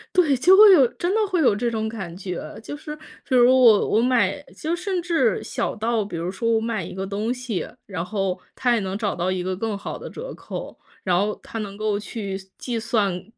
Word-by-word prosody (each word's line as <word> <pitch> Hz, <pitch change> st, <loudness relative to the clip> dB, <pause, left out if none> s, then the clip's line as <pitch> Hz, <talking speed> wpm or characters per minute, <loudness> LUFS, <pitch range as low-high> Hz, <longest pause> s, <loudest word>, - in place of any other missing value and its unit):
对， 310 Hz, -7 st, +4 dB
就 365 Hz, +9 st, +6 dB
会 420 Hz, -1 st, +9 dB
有 280 Hz, -9 st, +7 dB
真 350 Hz, -, -2 dB
的 445 Hz, -, +2 dB
会 360 Hz, -3 st, +1 dB
有 255 Hz, -, +4 dB
这 235 Hz, +3 st, -1 dB
种 220 Hz, -1 st, -2 dB
感 190 Hz, -7 st, -6 dB
觉。 180 Hz, -2 st, -5 dB, 0.2 s
就 290 Hz, -, -6 dB
是， 300 Hz, +1 st, -8 dB, 0.3 s
比 260 Hz, -, 0 dB
如 245 Hz, -1 st, +6 dB
我 230 Hz, -5 st, +6 dB
我 220 Hz, -, +3 dB
买 250 Hz, 0 st, +2 dB
就 325 Hz, +2 st, -2 dB
甚 365 Hz, +1 st, -2 dB
至 340 Hz, -1 st, +1 dB
小 -, -, -3 dB
到 225 Hz, 0 st, 0 dB
比 200 Hz, -4 st, -6 dB
如 170 Hz, +2 st, -3 dB
说 230 Hz, +5 st, -1 dB
我 225 Hz, -1 st, +3 dB
买 225 Hz, -3 st, -2 dB
一 -, -, -7 dB
个 190 Hz, +1 st, -4 dB
东 210 Hz, +4 st, -2 dB
西， 250 Hz, -6 st, -3 dB, 0.2 s
然 180 Hz, -4 st, -4 dB
后 195 Hz, -1 st, -2 dB, 0.2 s
他 245 Hz, -2 st, +2 dB
也 225 Hz, -, +1 dB
能 190 Hz, 0 st, -3 dB
找 210 Hz, -2 st, -1 dB
到 180 Hz, +2 st, -1 dB
一 185 Hz, -1 st, -1 dB
个 185 Hz, +1 st, -2 dB
更 220 Hz, 0 st, -2 dB
好 200 Hz, -, -6 dB
的 -, -, -8 dB
折 -, -, -7 dB
扣。 -, -, -7 dB, 0.3 s
然 180 Hz, -2 st, +2 dB
后 210 Hz, +2 st, 0 dB
他 225 Hz, -, -7 dB
能 200 Hz, -2 st, -6 dB
够 215 Hz, -1 st, 0 dB
去 205 Hz, -2 st, -5 dB, 0.2 s
计 240 Hz, -2 st, -3 dB
算 205 Hz, -5 st, 0 dB
220 Hz, 245 characters per minute, -23 LUFS, 195-255 Hz, 0.3 s, 会